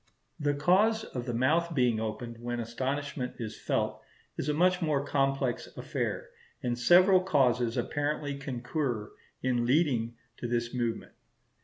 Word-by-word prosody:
The 145 -1 +1
cause 200 +9 +3
of 125 - -6
the 120 - -1
mouth 160 +7 +2
being 125 -4 +3
opened 115 +1 -5
when 120 0 -3
astonishment 130 +3 -3
is 110 -3 -5
felt, - - -1 0.3
is 150 - -3
a - - +2
much 180 +3 +3
more 150 -4 +1
complex 135 -3 0
affair; - - -3 0.3
and 120 -1 0
several 180 +10 +6
causes 125 -9 +2
apparently 145 0 -1
concur 125 -3 -3 0.3
in 120 -2 +1
leading 125 -5 +2 0.2
to 120 - -4
this 120 0 -1
movement. 120 -3 -2
130 Hz, 140 wpm, -30 LUFS, 120-150 Hz, 0.3 s, several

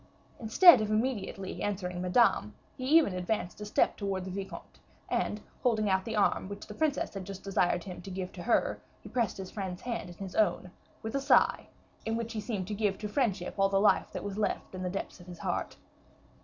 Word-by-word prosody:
Instead 245 +5 +8
of 215 - -1
immediately 215 -4 -2
answering 180 -3 -2
Madame, 180 - +3 0.2
he 255 - -5
even 300 - +3
advanced 180 +1 -2
a - - -4
step 210 - +2
towards 195 -2 -3
the 190 - -5
vicomte, 195 +1 -7 0.3
and 210 - -1 0.2
holding 215 -4 +2
out 190 0 +1
the 225 - -3
arm 200 -2 +2
which 200 0 -7
the 210 - -9
princess 295 +5 0
had 195 -2 -5
just 195 0 -8
desired 180 -3 +1
him 180 -3 -8
to 195 - -9
give 185 -1 -5
her, 235 - +1 0.2
he - - -11
pressed 235 -6 0
his 190 -1 -7
friend's 190 -3 -5
hand 230 -6 -3
in 175 - -10
his 195 -2 -7
own, 200 -4 +1 0.3
with 220 - -4
a 275 - 0
sigh, - - +4 0.4
in 225 0 -1
which 230 0 -4
he 215 - -3
seemed 205 -5 -3
to 210 - -3
give 205 -1 0
to 215 - -4
friendship 205 -6 0
all 195 0 +4
the 195 0 +2
life 210 - +3
that - - -5
was 205 0 -4
left 210 - -1
in 185 - -5
the 180 - -1
depths 195 +1 -5
of 175 - -14
his 175 -1 -9
heart. - - -3
200 Hz, 215 wpm, -30 LUFS, 185-220 Hz, 0.4 s, Instead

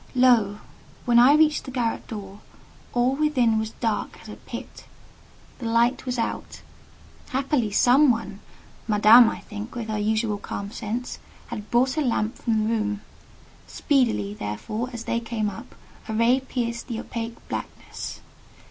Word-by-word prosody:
Lo! 235 -5 +4 0.5
when 240 -1 +5
I 260 +4 +7
reached 305 0 +3
the - - -7
garret 245 -3 -2
door, 200 -2 -8 0.5
all 245 +2 +2
within 260 -7 +2
was 220 0 -2
dark 225 -3 -2
as - - -13
a - - -7
pit: - - -9 0.7
the 235 - -4
light 235 +3 +2
was 250 0 -1
out. 230 - -4 0.7
Happily 265 -3 0
some 255 +7 +5
one—Madame, 220 0 +3
I - - -6
think, 210 +2 -8
with 230 -2 -5
her 215 -1 -1
usual 215 0 0
calm 200 0 -6
sense—had 215 -2 -6
brought 255 +5 +2
a - - +2
lamp 230 -3 0
from 220 -3 +1
the 215 - 0
room; 210 -2 -1 0.7
speedily, 105 - +1
therefore, 105 - -4
as 235 -2 -6
they 235 - -1
came 225 -3 -2
up, 230 +6 -11 0.3
a - - -2
ray 235 +4 +4
pierced 235 -3 -4
the 230 -3 -4
opaque 230 0 -5
blackness. - - -6
230 Hz, 150 wpm, -24 LUFS, 215-250 Hz, 0.7 s, I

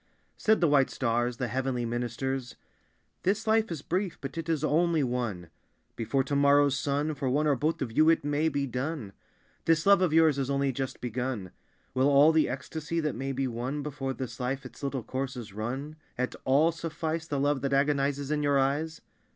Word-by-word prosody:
Said 220 -3 +2
the 170 - +5
white 145 -2 +4
stars, 120 -1 0
the 125 - -1
heavenly 125 0 -1
ministers, 120 +2 -3 0.7
"This 205 +4 0
life 220 0 +3
is 155 -4 -5
brief, 185 +1 -2
but 135 0 -6
it 165 -1 -4
is 160 -3 0
only 165 -1 +2
one. 115 -9 -3 0.4
Before 135 +4 0
to 140 +2 -2
morrow's 140 0 +4
sun 145 +3 -1
For 135 -2 -2
one 145 +4 +1
or 145 -2 +3
both 150 +3 -1
of 120 - -5
you 155 +7 +4
it 165 -3 +3
may 145 +2 +1
be 140 -2 -1
done. 125 -4 -4 0.5
This 165 0 +3
love 200 -1 +6
of 180 -4 +2
yours 160 -3 +4
is 135 0 -1
only 140 0 +1
just 130 +1 -4
begun. 125 -5 -3 0.4
Will 130 +2 +3
all 145 +3 +6
the 160 -4 +3
ecstasy 150 +5 -4
that 155 -3 -1
may 135 +3 -3
be 135 0 -1
won 125 +5 -3
Before 140 -2 -3
this 125 -3 -6
life 130 +2 -2
its 130 - -11
little 135 -3 -2
course 130 +1 -3
has 115 -5 -8
run 130 +9 -4 0.2
At 125 +1 -1
all 145 +5 +4
suffice 160 0 -4
The 145 -3 -1
love 145 -1 +1
that 140 - -1
agonizes 140 0 +1
in 150 -1 +1
your 145 -1 +2
eyes? 145 +4 0
140 Hz, 200 wpm, -28 LUFS, 130-155 Hz, 0.7 s, love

